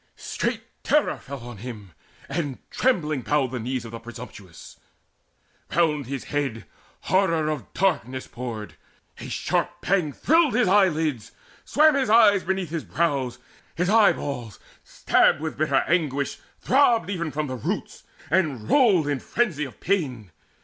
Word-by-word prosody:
Straight - - -3 0.2
terror 300 0 +2
fell 140 -1 -9
on 120 -2 -9
him, 105 -4 -9 0.4
and 145 -3 -3
trembling 155 - +1
bowed 140 -2 0
The 125 - -3
knees 125 +1 -3
of 115 - -8
the 115 - -7
presumptuous: 115 -7 -11 1.0
round 150 -6 +2
his 135 0 -4
head 135 -7 -3 0.4
Horror 165 -5 +1
of 145 -9 -5
darkness 135 -9 0
poured; 110 -9 -7 0.4
a - - -7
sharp - - 0
pang 180 -6 +1
thrilled 310 - +2
His 245 -3 +3
eyelids; 160 - +2 0.3
swam 310 +1 +5
his 270 -5 0
eyes 210 -3 +6
beneath 190 -3 -2
his 165 -2 -3
brows; 140 -7 -1 0.4
His 180 +2 0
eyeballs, 140 - +2 0.3
stabbed - - +2
with 155 0 -4
bitter 145 -3 +2
anguish, 145 -5 0 0.2
throbbed 240 - +3
Even 170 -4 -2
from 155 +1 -2
the 130 -2 -4
roots, 120 - -4 0.3
and 150 - +1
rolled 205 - +4
in 145 -2 0
frenzy 170 - -1
of 130 - -12
pain. 130 - -1
150 Hz, 145 wpm, -24 LUFS, 125-190 Hz, 1.0 s, eyes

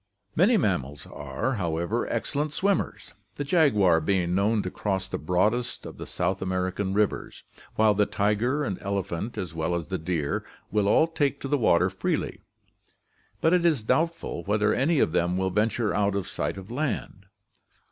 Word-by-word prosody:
Many 210 +8 +5
mammals 75 - -1
are, 75 - -3
however, 85 +5 -1
excellent 145 +6 -1
swimmers, 200 0 -1 0.2
the 145 - -3
jaguar 105 - +4
being 90 0 +1
known 105 +3 +2
to 90 - -4
cross 95 -2 -2
the - - -4
broadest 105 +9 0
of - - -9
the - - -6
South 95 +1 -1
American 95 +1 -1
rivers, 105 -1 -1 0.3
while 110 -1 +4
the 105 0 +2
tiger 110 +8 +1
and 100 -9 -3
elephant, 100 +1 -3
as 90 -4 -4
well 80 +1 -1
as 85 -1 -4
the 95 -2 -2
deer, 80 -3 -1 0.3
will 105 -1 +2
all 130 - +5
take 145 -4 -1
to - - -3
the 145 - +2
water 90 -4 +3
freely; 95 - -2 1.0
but 160 - +4
it 180 -1 +3
is 155 -9 +2
doubtful 160 - 0
whether 105 +1 +2
any 150 +5 +2
of 80 - +3
them 90 +1 +1
will 95 0 0
venture 105 +2 +1
out 100 -1 +1
of 100 -3 -2
sight - - -3
of 95 +3 -9
land. 120 -8 -3
100 Hz, 170 wpm, -26 LUFS, 90-125 Hz, 1.0 s, Many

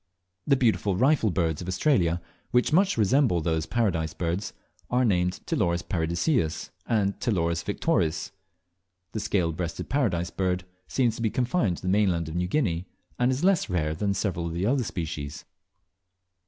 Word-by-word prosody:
The 140 - +5
beautiful 110 -6 +2
Rifle 130 +1 +3
Birds 85 -4 0
of 90 - -6
Australia, 90 - +1 0.3
which 125 +4 +2
much 190 -1 +3
resemble 115 -2 +3
those 80 0 -1
Paradise 85 -10 0
Birds, 90 +4 -2 0.4
are 125 +1 +2
named 90 -4 +1
Ptiloris 85 -3 0
paradiseus 85 - 0 0.2
and 100 -4 +1
Ptiloris 85 -6 0
victories, 85 - 0 0.8
The 110 - -3
Scale 90 -5 0
breasted 85 0 -4
Paradise 90 -12 0
Bird 90 -1 -1 0.2
seems 120 -4 +1
to - - -6
be 115 - +2
confined 120 - +1
to - - -11
the - - -3
mainland 90 -4 +2
of 80 - -6
New 90 0 0
Guinea, 90 - 0 0.3
and 125 +1 +3
is 130 +4 -2
less 190 - +3
rare 80 -4 0
than 100 +5 -1
several 90 -5 -1
of 85 - -4
the 90 +3 -1
other 130 +3 +2
species. 75 -7 -5
95 Hz, 160 wpm, -26 LUFS, 85-120 Hz, 0.8 s, The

